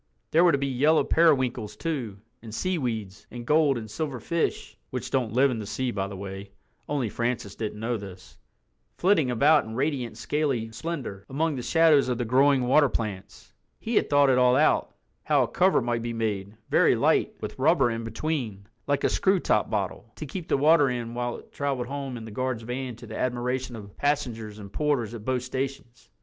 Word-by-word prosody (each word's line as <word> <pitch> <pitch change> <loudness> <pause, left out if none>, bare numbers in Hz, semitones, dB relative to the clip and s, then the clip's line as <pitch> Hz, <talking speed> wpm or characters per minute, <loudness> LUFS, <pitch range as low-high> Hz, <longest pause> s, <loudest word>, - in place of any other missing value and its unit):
There 165 +2 +5
were 175 - +6
to 140 - +2
be 140 - -1
yellow 140 +4 +3
periwinkles 130 -9 +2
too, 130 -12 -3 0.2
and 115 - -10
seaweeds, 110 - -3
and 120 -1 -8
gold 150 -1 +3
and 110 -2 -6
silver 130 +4 -4
fish 170 +8 -2
(which - - -5
don't 125 -5 0
live 135 +2 +4
in 115 - -3
the 105 - -6
sea 130 +4 -2
by 100 -3 -2
the 100 -1 -8
way, 95 0 -8 0.4
only 140 -5 0
Francis 120 -2 -2
didn't 105 -1 -5
know 115 +2 -1
this), 95 -3 -11 0.6
flitting 175 -8 +3
about 145 +6 +4
in 110 0 -8
radiant 130 -3 -2
scaly 135 -7 -1
splendor, 125 - -5
among 155 +3 0
the 125 - -4
shadows 155 -1 +4
of 125 - 0
the 120 - -2
growing 135 +3 +4
water 140 +3 +4
plants. 105 -5 -5 0.3
He 230 - -4
had - - +2
thought 145 -1 +5
it 125 - +3
all 125 0 +5
out—how 155 +3 +1
a - - -1
cover 185 -7 +3
might 120 -1 -1
be 120 0 -3
made, 105 -2 -3
very - - +5
light, - - +2
with - - -7
rubber 135 -3 +4
in 115 0 -4
between, 115 -4 -3 0.2
like 145 -1 0
a - - +4
screw 190 0 +2
top 105 -10 +1
bottle, 105 +2 -3
to 155 - -6
keep 165 +4 -6
the - - +2
water 145 0 +5
in 120 -2 -4
while 120 0 -3
it - - -16
traveled 140 -3 -2
home 135 -1 -5
in 115 - -8
the 110 - -9
guard's 130 0 -2
van 125 +1 -4
to 120 - -12
the 110 0 -7
admiration 125 0 -2
of 100 -2 -11
passengers 115 -7 -1
and 100 -2 -10
porters 140 -7 0
at 115 -3 -7
both 130 -1 0
stations. 130 -2 -5
125 Hz, 200 wpm, -26 LUFS, 110-145 Hz, 0.6 s, were